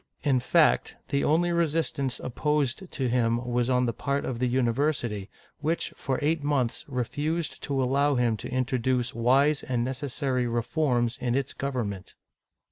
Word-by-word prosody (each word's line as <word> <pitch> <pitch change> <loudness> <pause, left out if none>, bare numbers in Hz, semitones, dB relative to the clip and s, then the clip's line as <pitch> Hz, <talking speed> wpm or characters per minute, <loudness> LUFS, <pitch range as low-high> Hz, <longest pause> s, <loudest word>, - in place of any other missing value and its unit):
In 135 -4 +3
fact, 60 - +3
the 140 - +1
only 175 +3 +2
resistance 160 -5 0
opposed 150 +6 -1
to 135 -3 -1
him 120 -1 +2
was 120 0 0
on 125 -1 +3
the 115 - -1
part 140 +5 -2
of 120 -3 -3
the 125 - +1
university, 120 -4 0 0.3
which, 160 +3 -1
for 130 -2 -2
eight 155 0 +1
months, 140 -5 0
refused 145 +5 -2
to 135 -2 0
allow 140 +3 +2
him 120 -2 +2
to - - -7
introduce 125 -1 0
wise 135 +5 +3
and 120 -2 -1
necessary 130 -1 -1
reforms 120 +1 0
in 120 -1 0
its 135 0 -1
government. 115 -9 -4
130 Hz, 150 wpm, -27 LUFS, 120-145 Hz, 0.3 s, In